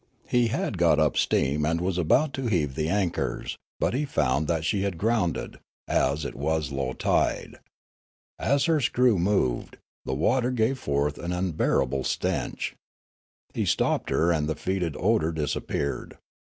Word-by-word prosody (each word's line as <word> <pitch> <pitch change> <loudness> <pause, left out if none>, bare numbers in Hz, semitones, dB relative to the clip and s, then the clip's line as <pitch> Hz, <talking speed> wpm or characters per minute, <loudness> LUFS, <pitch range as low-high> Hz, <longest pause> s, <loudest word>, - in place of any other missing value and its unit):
He 120 -1 +3
had 110 -4 -2
got 85 -3 +4
up 75 -1 +2
steam 70 +3 +1
and 80 +2 +1
was 90 +1 -1
about 135 - +3
to 135 -2 -2
heave 80 -10 0
the 75 +3 -1
anchors, 95 -3 -1 0.2
but - - +1
he 135 +4 0
found 75 - 0
that 80 -2 0
she 95 +4 +1
had 100 -3 -2
grounded, 110 -4 -1 0.3
as 75 +2 +1
it - - -4
was 75 0 -1
low 70 -2 -2
tide. - - 0 0.8
As 140 0 +2
her 160 -3 +2
screw 120 -4 +3
moved, 85 -10 0 0.3
the 65 - -2
water 125 - +2
gave 125 +1 0
forth 70 - -1
an 85 - -4
unbearable 75 -7 0
stench. - - -2 0.8
He - - -1
stopped - - +1
her 85 +2 +2
and 75 -2 0
the 80 - -1
fetid 90 -4 -2
odour 100 -4 +2
disappeared. 75 -2 -3
85 Hz, 155 wpm, -26 LUFS, 75-110 Hz, 0.8 s, got